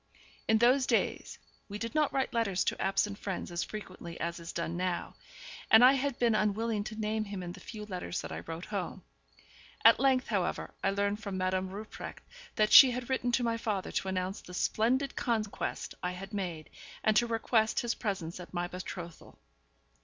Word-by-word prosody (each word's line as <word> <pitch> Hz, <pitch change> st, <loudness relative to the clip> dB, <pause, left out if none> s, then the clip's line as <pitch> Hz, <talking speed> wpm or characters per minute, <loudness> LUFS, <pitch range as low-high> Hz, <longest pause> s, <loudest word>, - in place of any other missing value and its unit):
In 220 Hz, -, +5 dB
those 255 Hz, +3 st, +4 dB
days -, -, 0 dB, 0.3 s
we 205 Hz, -, -5 dB
did 230 Hz, +3 st, -4 dB
not 305 Hz, -2 st, +2 dB
write 265 Hz, -1 st, -1 dB
letters 200 Hz, -6 st, +1 dB
to -, -, -1 dB
absent 195 Hz, +1 st, 0 dB
friends 190 Hz, -3 st, -4 dB
as 170 Hz, 0 st, -1 dB
frequently 185 Hz, -5 st, -8 dB
as 170 Hz, +1 st, -3 dB
is 170 Hz, 0 st, -7 dB
done 170 Hz, 0 st, -3 dB
now, 180 Hz, 0 st, -2 dB, 0.6 s
and 225 Hz, +3 st, +9 dB
I 260 Hz, -, +8 dB
had 275 Hz, -1 st, -1 dB
been 235 Hz, -2 st, +3 dB
unwilling 215 Hz, 0 st, +1 dB
to 215 Hz, -, -6 dB
name 215 Hz, 0 st, -1 dB
him 200 Hz, -2 st, -5 dB
in 175 Hz, -, -5 dB
the -, -, -10 dB
few 215 Hz, -2 st, -8 dB
letters 185 Hz, -3 st, -4 dB
that -, -, -7 dB
I -, -, -4 dB
wrote 165 Hz, +2 st, -7 dB
home. 195 Hz, -2 st, -4 dB, 0.8 s
At -, -, +8 dB
length, 265 Hz, -1 st, +3 dB
however, 190 Hz, -5 st, -1 dB
I -, -, +3 dB
learned 200 Hz, +1 st, 0 dB
from 200 Hz, -3 st, -4 dB
Madame 185 Hz, 0 st, 0 dB
Rupprecht 210 Hz, +3 st, -8 dB, 0.3 s
that 215 Hz, 0 st, +2 dB
she 270 Hz, -, +11 dB
had 250 Hz, +1 st, -4 dB
written 245 Hz, -2 st, +1 dB
to 245 Hz, -, +2 dB
my 230 Hz, -1 st, +1 dB
father 215 Hz, -5 st, -2 dB
to -, -, -2 dB
announce 190 Hz, +1 st, -2 dB
the 180 Hz, -, -10 dB
splendid 255 Hz, +8 st, +1 dB
conquest 220 Hz, -4 st, -2 dB
I 180 Hz, 0 st, -2 dB
had 195 Hz, +3 st, -8 dB
made, 175 Hz, -6 st, -4 dB, 0.3 s
and 215 Hz, -, +3 dB
to 240 Hz, -, +4 dB
request 225 Hz, -1 st, +1 dB
his 240 Hz, -1 st, 0 dB
presence 185 Hz, -6 st, -4 dB
at 180 Hz, +1 st, -10 dB
my 175 Hz, 0 st, -1 dB
betrothal. 175 Hz, -2 st, -8 dB
205 Hz, 190 wpm, -31 LUFS, 185-230 Hz, 0.8 s, she